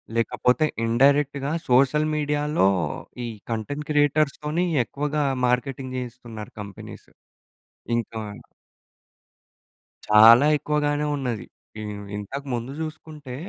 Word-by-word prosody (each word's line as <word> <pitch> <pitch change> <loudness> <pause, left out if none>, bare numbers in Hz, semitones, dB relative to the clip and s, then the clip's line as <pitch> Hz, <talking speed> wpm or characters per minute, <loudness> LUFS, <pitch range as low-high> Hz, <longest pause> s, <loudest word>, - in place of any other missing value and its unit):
లేకపోతే 125 +5 +2 0.2
ఇండైరెక్ట్‌గా 140 +3 +2 0.2
సోషల్ 140 +5 +4
మీడియాలో 150 -5 +1 0.6
ఈ - - -3 0.2
కంటెంట్ 145 +7 -4
క్రియేటర్స్‌తోనీ 150 +3 +1 0.2
ఎక్కువగా 150 +4 -2 0.2
మార్కెటింగ్ 130 +1 -1
చేయిస్తున్నారు 120 -3 -8
కంపెనీస్. 100 -2 -10 0.9
ఇంకా 115 -1 -4 1.9
చాలా 115 +5 +8
ఎక్కువగానే 150 0 0
ఉన్నది. 125 -6 -3 0.3
ఇ - - -5 0.4
ఇంతక 135 +8 -6
ముందు 120 +2 -3
జూసుకుంటే, 155 -4 -7
140 Hz, 85 wpm, -24 LUFS, 120-150 Hz, 1.9 s, చాలా